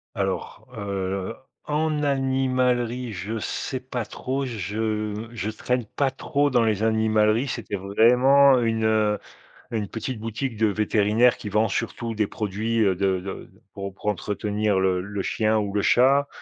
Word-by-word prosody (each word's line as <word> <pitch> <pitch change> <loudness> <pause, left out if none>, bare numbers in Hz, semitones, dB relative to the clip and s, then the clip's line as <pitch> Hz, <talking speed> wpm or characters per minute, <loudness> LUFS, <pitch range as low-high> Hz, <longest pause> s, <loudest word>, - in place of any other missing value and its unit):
Alors, 95 +3 -3
heu, 95 -2 -3 0.3
en 150 0 0
animalerie, 130 -3 0
je 105 +4 -4
sais 130 +4 -3
pas 125 -3 -4
trop. 135 +5 -3
Je 110 0 -3
je 110 -3 -3
traîne 120 +2 -2
pas 135 +5 -1
trop 140 +1 0
dans 120 -2 +3
les 110 -2 +1
animaleries. 110 +2 +2
C'était 105 -5 -4
vraiment 125 +7 +5
une, 115 -1 0
heu, 110 -1 +2 0.5
une 110 -3 -2
petite 115 +3 -5
boutique 115 +2 -4
de 110 - +3
vétérinaires 105 +3 +3
qui 105 - -6
vend 110 +2 +2
surtout 115 +3 -3
des 105 0 +1
produits, 110 +3 -2
heu, 100 -4 +3
de 95 0 +1
de, 95 +1 -8 0.2
pour 100 -1 -6
pour 100 - -10
entretenir 105 +1 0
le 95 -1 +2
le 100 +2 -4
chien 110 +2 +1
ou 100 -2 -3
le 100 - +1
chat 135 +3 +4
110 Hz, 155 wpm, -24 LUFS, 105-125 Hz, 0.5 s, vraiment